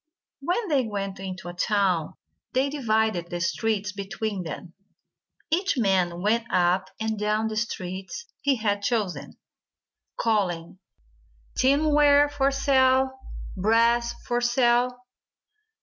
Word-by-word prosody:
When 360 +10 -1
they 270 -6 +2
went 195 -2 -4
into 190 -2 -6
a 175 - -6
town, 180 -4 0 0.4
they 270 +2 +1
divided 220 - 0
the 175 - -4
streets 205 +3 -1
between 200 0 -4
them. 170 +1 -7 0.8
Each 370 0 +1
man 185 -5 +1
went 225 +2 +1
up 180 +1 +2
and 220 -1 -2
down 215 +1 0
the 215 - -5
streets 190 - -4 0.2
he 280 -1 +2
had 205 -3 -1
chosen, 210 -4 -2 0.8
calling, 185 -6 -1 0.8
"Tinware 290 +1 +4
for 275 -1 +1
sale. 265 -1 +3 0.4
Brass 230 +4 +2
for 240 0 -1
sale." 245 0 +2
220 Hz, 115 wpm, -25 LUFS, 190-260 Hz, 0.8 s, Tinware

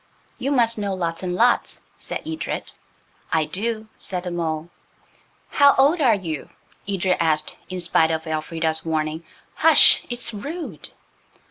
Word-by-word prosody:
"You 265 - -1
must 230 -5 +2
know 200 -2 -2
lots 170 -2 -3
and 180 -1 -2
lots," 240 +4 +2
said - - -6
Edred. 320 0 -4 0.6
"I 160 -1 +2
do," 220 +5 -3
said 180 -2 -3
the 180 - -4
mole. 165 -1 -3 0.8
"How 285 0 +5
old 290 +5 +4
are 240 -6 +5
you?" 165 -7 -5 0.4
Edred 190 -2 +1
asked, 155 -2 0
in 185 -1 -4
spite 165 -1 +3
of 160 0 -2
Elfrida's 160 0 -2
warning 155 0 -2 0.3
"Hush! 320 0 +6
it's 240 -1 -4
rude." 275 - -7
185 Hz, 140 wpm, -22 LUFS, 160-235 Hz, 0.8 s, Hush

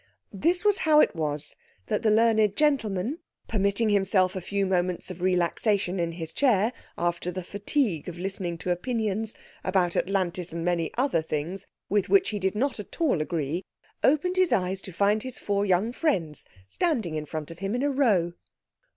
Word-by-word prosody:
This 345 - +1
was 415 -1 +4
how 305 -1 +5
it - - +4
was 150 -2 -3 0.3
that - - -1
the 225 - +3
learned 220 -2 +4
gentleman, 260 - +1 0.3
permitting 200 +1 +1
himself 190 -2 +2
a 185 - -3
few 200 +2 -1
moments 180 -1 0
of 180 -1 -9
relaxation 185 +1 +1
in 170 -1 -1
his 165 -1 -6
chair, 235 -4 +3 0.2
after 175 0 -1
the 185 +1 -5
fatigue 205 - -1
of 175 - -8
listening 180 -2 -3
to 180 - -2
opinions 220 +2 -1 0.3
(about 185 -2 +1
Atlantis 180 -2 -1
and 165 0 -4
many 170 -2 +1
other 255 - +2
things) 160 +5 -4 0.2
with 205 0 +1
which 385 -1 +4
he 210 - -3
did 190 +1 0
not 260 +2 0
at 210 - -9
all 280 - +2
agree, 160 +2 -2 0.4
opened 335 +6 +3
his 370 -2 +3
eyes 190 -4 0
to 190 - -9
find 205 +4 +2
his 255 0 -4
four 200 0 -1
young 190 +5 +2
friends 180 - -1 0.2
standing 225 - -1
in 155 -1 -4
front 155 0 -5
of 165 - -11
him 195 +4 -2
in 250 - -1
a 290 - +2
row. 205 -11 +2
195 Hz, 180 wpm, -27 LUFS, 175-230 Hz, 0.4 s, how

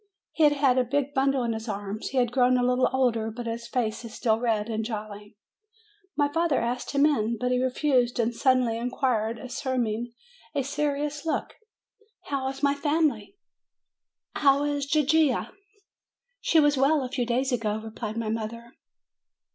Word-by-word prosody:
Hfe 300 -2 +6
had 275 -3 +3
a - - +3
big 280 +3 -1
bundle 270 -1 +2
in 230 -1 -1
his 220 +1 -6
arms. 205 +1 -4
He 270 - -4
has 245 -2 +3
grown 250 0 +3
a 245 - +1
little 250 +1 +2
older, 240 -4 +1
but 235 +2 -7
his 230 0 -4
face 235 -2 -2
is 230 -1 -9
still 225 -2 +1
red 225 -3 0
and 220 -1 -2
jolly. 210 -1 -7 0.8
My 290 -1 +3
father 325 0 +1
asked 245 +2 -2
him 280 +1 +4
in; 235 -6 +1
but 250 0 0
he 250 0 +2
refused, 255 -2 +1
and 235 0 +1
sud 260 +2 +3
denly 230 -2 -1
inquired, 235 -2 0
assuming 240 -2 -3 0.4
a 280 - +1
serious 290 +1 -2
look: 320 - -2 0.8
"How 275 -2 -1
is 270 +1 -8
my 280 0 +4
family? 295 - 0 1.0
How 280 -1 +3
is 290 -1 -1
Gigia?" 300 -2 +2 0.9
"She 325 - +3
was 290 -2 +4
well 275 +2 +3
a 255 - -4
few 260 -2 -1
days 255 +3 0
ago," 220 -3 0
replied 220 0 -6
my 225 -2 -2
mother. 230 +2 -5
250 Hz, 170 wpm, -26 LUFS, 230-280 Hz, 1.0 s, Hfe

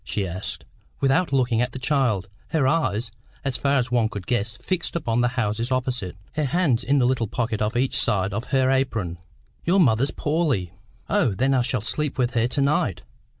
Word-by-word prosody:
she 100 -2 -2
asked, 95 +3 -6 0.3
without 140 +5 +2
looking 125 -4 +2
at 125 -1 -1
the - - -5
child; 130 -8 +1 0.2
her 150 -5 +1
eyes, 125 -8 0 0.3
as 135 -2 -1
far 140 0 +2
as 125 -2 -1
one 115 -3 +2
could 100 -4 -6
guess, 110 -2 -1
fixed 180 -2 -3
upon 120 -8 0
the 120 - +3
houses 115 +2 -1
opposite, 125 -7 -1 0.2
her 155 -1 -1
hands 140 -5 +1
in 140 +3 +2
the 130 - +4
little 120 -3 +1
pocket 115 -1 -2
on 110 +3 0
each 130 +2 +1
side 95 -1 +1
of 115 +4 -3
her 130 -1 +2
apron. 115 -11 -1 0.4
"Your 185 +4 +3
mother's 130 -4 +4
poorly." 145 - 0 0.3
"Oh, 105 - +2
then 130 +6 +2
I 130 - +3
shall 120 -1 -1
sleep 150 +6 -2
with 125 -2 +1
her 115 -1 +2
to 125 +3 -1
night?" 140 - +1
125 Hz, 195 wpm, -24 LUFS, 110-135 Hz, 0.4 s, the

